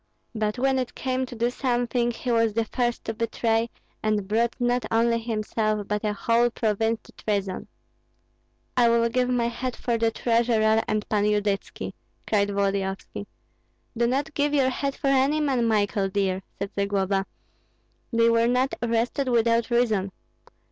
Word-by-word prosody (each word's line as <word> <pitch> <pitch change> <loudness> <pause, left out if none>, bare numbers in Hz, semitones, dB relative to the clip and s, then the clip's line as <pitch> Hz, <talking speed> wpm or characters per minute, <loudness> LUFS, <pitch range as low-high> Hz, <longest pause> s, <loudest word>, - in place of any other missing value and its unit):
But 215 0 -1
when 265 +1 +2
it 250 -1 -4
came 260 0 -1
to 245 - -9
do 235 +2 0
something, 245 -2 0
he 240 +1 -3
was 230 -2 +2
the 230 -1 +1
first 240 +1 -2
to 225 - -2
betray, 230 0 0 0.3
and 210 -2 0
brought 230 +3 +1
not 245 0 +1
only 230 +1 +2
himself, 215 -2 -1
but 210 +1 -2
a 210 - +1
whole 230 +3 +2
province 225 -1 0
to - - -17
treason." 200 -3 -3 1.1
"I 240 -2 +5
will 235 0 +3
give 250 +1 +1
my 245 -2 +1
head 240 +1 -3
for 235 -2 -1
the 230 0 +3
treasurer 225 -1 +2
and 215 -1 -1
Pan 210 -1 +1
Yudytski!" 205 -1 -1 0.3
cried 205 -2 +2
Volodyovski. 195 -1 -2 0.7
"Do 235 0 +2
not 275 +4 -1
give 290 0 +1
your 265 -2 +3
head 275 +1 -2
for - - -7
any 275 +2 +3
man, 265 -6 +1
Michael 205 -2 +1
dear," 190 -1 0 0.2
said 200 0 -4
Zagloba. 195 -1 0 0.8
"They 230 -1 +4
were 230 0 +4
not 250 +2 +1
arrested 235 +3 0
without 230 -1 +2
reason. 220 -5 +1
230 Hz, 160 wpm, -25 LUFS, 210-245 Hz, 1.1 s, I